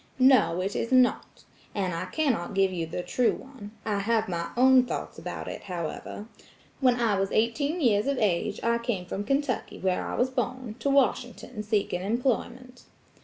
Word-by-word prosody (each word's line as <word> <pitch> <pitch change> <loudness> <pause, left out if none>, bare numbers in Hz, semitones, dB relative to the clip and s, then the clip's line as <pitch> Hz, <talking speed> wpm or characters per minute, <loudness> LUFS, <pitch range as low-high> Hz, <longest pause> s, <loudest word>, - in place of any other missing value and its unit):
"No, 255 -10 +5
it 195 +2 -2
is 230 - -2
not. 255 -1 +2 0.3
And 190 -3 -1
I 165 - -3
cannot 260 - -1
give 195 -1 +3
you 165 -2 -2
the 175 +2 -4
true 235 +7 +2
one. 260 -6 -10 0.2
I 210 -2 0
have 220 +2 +1
my 170 -2 -3
own 260 0 +6
thoughts - - -5
about - - -6
it, - - -6
however, 180 +3 -5 0.5
When 255 -3 +4
I 215 -4 +2
was 195 0 -1
eighteen 285 +9 +1
years 220 -6 +2
of 280 -1 0
age, 195 -7 0
I 235 0 +2
came 235 -6 -2
from 195 +3 -4
Kentucky, 275 +4 -1
where 185 -1 0
I - - -4
was 255 +1 +1
born, 255 -2 -3
to 280 - 0
Washington 250 -4 0
seeking 205 -4 -1
employment. 245 +3 -2
230 Hz, 175 wpm, -27 LUFS, 195-255 Hz, 0.5 s, own